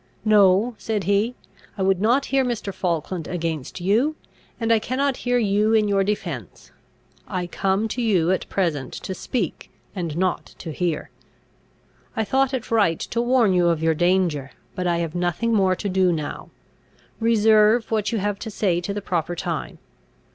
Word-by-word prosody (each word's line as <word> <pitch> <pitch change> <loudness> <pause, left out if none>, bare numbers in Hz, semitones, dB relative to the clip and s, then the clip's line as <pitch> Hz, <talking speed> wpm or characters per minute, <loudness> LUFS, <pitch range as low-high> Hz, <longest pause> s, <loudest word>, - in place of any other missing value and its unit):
"No," 210 +2 +5
said 215 -3 -2
he; 205 +6 +1 0.4
"I 190 - -1
would 190 -1 +2
not 245 +6 +3
hear 270 -1 +4
Mr. 235 -5 -3
Falkland 170 -2 -2
against 165 -4 -4
you; 230 - +2 0.4
and 230 -1 +2
I 225 - +4
cannot 265 +4 -1
hear 245 0 0
you 215 0 +2
in 215 -1 +3
your 200 -1 +2
defence. 170 - -4 0.6
I 180 -1 -2
come 195 +4 0
to 245 - -3
you 185 -7 +2
at 190 - -1
present 155 -9 -1
to 190 - -5
speak, 190 - -3 0.3
and 170 -4 -3
not 185 -1 -1
to 165 - -7
hear. 170 -1 -2 1.0
I 220 - +1
thought 265 +4 +1
it 255 -4 -4
right 200 -8 +3
to 235 - -2
warn 240 -5 +3
you 175 -1 +3
of 165 -1 0
your 160 0 +3
danger, 175 -5 +1 0.2
but 180 -1 -2
I 170 -1 +1
have 165 -2 -2
nothing 180 +6 0
more 190 -3 +3
to 200 - -4
do 185 -1 +2
now. 155 -3 -4 0.7
Reserve 220 0 +4
what 215 -1 0
you 230 - 0
have 205 0 -1
to 225 - -5
say 185 -5 0
to 200 +3 -4
the 205 - -4
proper 175 -1 -1
time. - - -4
195 Hz, 175 wpm, -23 LUFS, 175-225 Hz, 1.0 s, No